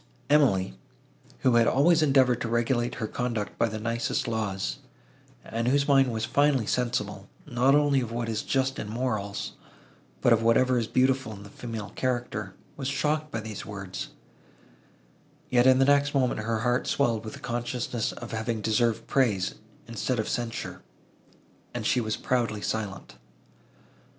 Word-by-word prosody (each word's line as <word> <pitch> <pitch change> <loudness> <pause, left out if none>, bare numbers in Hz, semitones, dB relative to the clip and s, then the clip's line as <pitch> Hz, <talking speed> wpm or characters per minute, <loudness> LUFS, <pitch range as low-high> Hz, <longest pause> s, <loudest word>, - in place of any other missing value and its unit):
Emily, 110 - +4 0.7
who 125 -2 +4
had 115 -1 +4
always 160 +5 +4
endeavoured 135 -5 +4
to - - -1
regulate 120 +1 0
her 110 - -3
conduct 115 -2 -3
by 115 - +3
the 110 0 -4
nicest 115 +2 -1
laws, 100 - -2 0.7
and 115 +1 -2
whose 140 +2 +3
mind 135 -3 +4
was 110 -1 -2
finely 140 -4 +2
sensible, 105 -5 -2 0.2
not 130 0 +3
only 145 -2 +3
of 115 -2 -4
what 120 0 -2
is 110 -1 -1
just 135 0 0
in 105 - -5
morals, 110 -4 -2 0.7
but 120 - +5
of 115 - +3
whatever 125 +2 +3
is 115 - -2
beautiful 130 -1 +2
in 100 -1 -10
the 105 - -12
female 115 -4 -6
character, 120 -6 -2 0.2
was 135 - -3
shocked 150 +2 0
by 115 - -3
these 110 -2 -6
words; 95 -3 -6 1.4
yet, 125 0 +5
in 130 0 +7
the 135 - +4
next 145 +1 +3
moment, 130 -4 +2
her 110 0 -1
heart 125 +2 +1
swelled 115 -6 +1
with 110 - -7
the - - -11
consciousness 120 -1 -2
of 120 - -9
having 110 0 -2
deserved 110 +1 +1
praise, 105 -9 +1 0.3
instead 115 +2 -2
of 110 - -1
censure, 120 -2 -4 0.9
and - - -3
she 125 - +2
was 110 -1 -2
proudly 115 -4 -1
silent. 100 - -4
120 Hz, 160 wpm, -27 LUFS, 110-130 Hz, 1.4 s, in